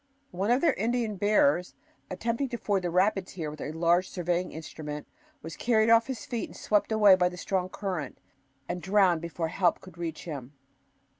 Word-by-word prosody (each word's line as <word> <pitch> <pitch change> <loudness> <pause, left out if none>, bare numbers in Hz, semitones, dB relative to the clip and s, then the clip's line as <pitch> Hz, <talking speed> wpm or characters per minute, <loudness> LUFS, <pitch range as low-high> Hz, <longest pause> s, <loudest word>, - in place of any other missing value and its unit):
One 190 +4 -2
of 245 +3 +3
their 340 - +4
Indian 230 0 -1
bearers, 180 -4 +2 0.3
attempting 230 +8 -2
to 240 - -4
ford 200 -4 0
the 175 - -2
rapids 185 +2 +1
here 160 -5 -4
with 150 - -10
a 150 - -4
large 170 +3 +2
surveying 175 0 -1
instrument, 150 -1 -7 0.4
was 165 - -7
carried 225 -2 +2
off 230 +1 +5
his 260 -3 -5
feet, 235 -3 -4
swept 210 +1 0
away 210 -3 +7
by 180 -1 +2
the 180 - -10
strong 185 -2 -1
current, 180 -8 -4 0.5
and 180 - -4
drowned 190 -4 +3
before 170 -1 -3
help 180 0 +1
could 180 -2 -15
reach 165 -2 -4
him. 140 -5 -7
185 Hz, 180 wpm, -28 LUFS, 170-215 Hz, 0.5 s, away